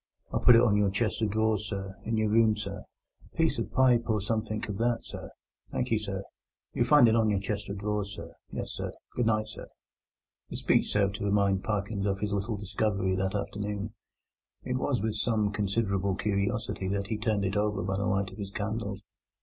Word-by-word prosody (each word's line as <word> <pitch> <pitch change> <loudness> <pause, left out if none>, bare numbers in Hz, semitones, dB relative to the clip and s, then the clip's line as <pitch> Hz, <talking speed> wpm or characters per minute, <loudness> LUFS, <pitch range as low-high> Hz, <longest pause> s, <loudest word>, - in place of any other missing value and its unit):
I - - +2
put 120 - +9
it 115 - +7
on 105 -4 +4
your 105 -1 +3
chest 105 +2 0
of 110 - +2
drawers, 110 0 +1
sir, 95 -2 -4
in 115 0 0
your 110 -1 +2
room, 110 -1 +5
sir—a 105 - -10
piece 160 -5 +2
of 115 - -1
a - - -22
pipe 125 -3 +4
or 110 -1 +2
somethink 110 +1 -2
of 100 -2 -4
that, 120 0 +1
sir. - - -8 0.4
Thank - - -2
you, 110 - +3
sir. 100 -2 -4 0.5
You'll - - +1
find 145 -5 +7
it 110 - +4
on 110 -2 +3
your 100 -2 +2
chest 100 +1 -3
of 100 - -4
drawers, 105 0 -2
sir—yes, 85 0 -7
sir. - - -4 0.2
Good 120 -2 +1
night, 110 -1 +2
sir." 105 - -8 0.8
The - - -6
speech - - +2
served 100 0 +2
to 100 - -3
remind 100 -1 +2
Parkins 100 -1 -1
of 95 -1 0
his 105 0 -1
little 100 +2 -1
discovery 100 -1 0
of 95 - 0
that 95 +1 -1
afternoon. 105 +1 -3 0.7
It 125 - -1
was 130 -5 0
with 110 -1 0
some 105 -1 +1
considerable 100 -2 0
curiosity 100 0 -1
that 100 0 -2
he 110 - -1
turned 105 -3 +1
it 95 +1 -1
over 105 -2 +1
by 95 +1 -1
the 100 - -1
light 100 0 0
of - - -12
his 100 -1 -4
candles. 105 -1 -3
105 Hz, 210 wpm, -29 LUFS, 100-110 Hz, 0.8 s, put